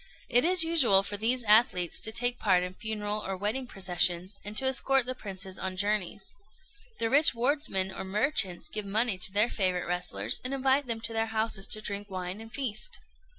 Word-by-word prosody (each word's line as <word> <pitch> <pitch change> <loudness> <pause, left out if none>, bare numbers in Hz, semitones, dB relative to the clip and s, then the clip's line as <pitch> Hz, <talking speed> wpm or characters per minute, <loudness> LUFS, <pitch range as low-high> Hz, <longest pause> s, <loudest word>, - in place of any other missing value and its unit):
It 245 - +3
is 355 0 +5
usual 265 -13 +3
for 205 +1 -4
these 235 +4 +1
athletes 210 -5 +3
to 220 - -1
take 245 +2 +2
part 185 -3 +2
in 180 0 -6
funeral 210 0 -4
or 195 0 -4
wedding 220 +7 -3
processions, 185 -1 0
and 210 +1 -6
to 265 - +3
escort 265 0 +2
the 255 - -2
princes 195 -5 -5
on 185 -1 -5
journeys. 205 -1 -2 0.6
The 225 - -1
rich 285 +2 +5
wardsmen 235 -7 0
or - - -7
merchants 200 - -1
give 215 - -5
money 205 0 0
to 185 - +4
their 210 +4 +2
favourite 185 -3 -1
wrestlers, 170 - 0
and 260 +2 -3
invite 270 +1 +1
them 230 -1 -3
to 225 +1 -1
their 225 0 -1
houses 220 -3 -1
to 215 - -2
drink 205 -1 -5
wine 185 +2 -6
and 225 0 -12
feast. 275 - -1
215 Hz, 195 wpm, -28 LUFS, 190-245 Hz, 0.6 s, is